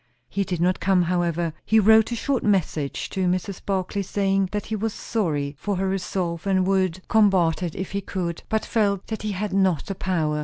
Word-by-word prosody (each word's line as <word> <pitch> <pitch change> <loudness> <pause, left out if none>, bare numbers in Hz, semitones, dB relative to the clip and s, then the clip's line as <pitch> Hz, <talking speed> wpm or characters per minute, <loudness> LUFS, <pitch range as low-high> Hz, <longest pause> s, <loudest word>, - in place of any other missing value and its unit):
He 200 - -1
did 180 -3 -3
not 180 +2 +2
come, 190 -2 +3
however; 170 -2 0
he 220 - +4
wrote 220 +2 +5
a - - 0
short 265 +2 -1
answer 170 -8 +1
to 185 +5 -3
Mrs. 185 +1 -2
Barclay, 195 +1 -1
saying 195 -1 0
that 210 -1 -3
he 220 - -3
was 215 +1 -2
sorry 150 -10 -2
for 205 -1 -2
her 190 +1 -1
resolve, 180 -2 -2
and 190 -1 +2
would 185 -2 0
combat 190 -7 +3
it 170 -3 -3
if 190 - -5
he 200 0 -2
could; 175 -3 -4
but 220 0 0
felt 200 -4 +1
that 220 - -4
he 215 -1 -2
had 195 +1 -3
not 190 -5 +2
the 195 - -3
power. 165 -5 -1
190 Hz, 205 wpm, -24 LUFS, 175-205 Hz, -, wrote